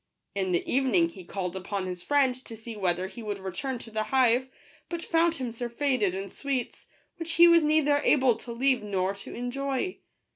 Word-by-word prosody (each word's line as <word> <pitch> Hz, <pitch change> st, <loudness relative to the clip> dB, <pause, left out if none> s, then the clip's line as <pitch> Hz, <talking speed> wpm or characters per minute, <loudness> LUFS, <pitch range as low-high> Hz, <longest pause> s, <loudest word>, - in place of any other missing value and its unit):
In 190 Hz, -2 st, -1 dB
the 175 Hz, -, +1 dB
evening 240 Hz, -11 st, +3 dB
he 185 Hz, +2 st, -11 dB
called 180 Hz, 0 st, -4 dB
upon 190 Hz, +1 st, -3 dB
his 180 Hz, -1 st, -5 dB
friend 280 Hz, +2 st, +3 dB
to 225 Hz, -, -8 dB
see 225 Hz, +1 st, -8 dB
whether 185 Hz, -3 st, 0 dB
he 225 Hz, +5 st, -8 dB
would 210 Hz, -2 st, -3 dB
return 195 Hz, +8 st, -4 dB
to 230 Hz, -1 st, -11 dB
the 215 Hz, 0 st, -1 dB
hive; 255 Hz, +2 st, +3 dB, 0.4 s
but 340 Hz, -1 st, -4 dB
found 330 Hz, 0 st, +2 dB
him 255 Hz, -5 st, -4 dB
surfeited 235 Hz, -3 st, 0 dB
in 195 Hz, 0 st, -5 dB
sweets, 275 Hz, -3 st, -4 dB, 0.3 s
which 335 Hz, 0 st, -4 dB
he 340 Hz, +1 st, +8 dB
was 335 Hz, -1 st, +7 dB
neither 300 Hz, -1 st, +3 dB
able 260 Hz, -4 st, +4 dB
to 235 Hz, -, -8 dB
leave 255 Hz, +2 st, +2 dB
nor 195 Hz, -2 st, -1 dB
to 200 Hz, -, -9 dB
enjoy. 270 Hz, +7 st, -2 dB
240 Hz, 190 wpm, -28 LUFS, 195-275 Hz, 0.4 s, he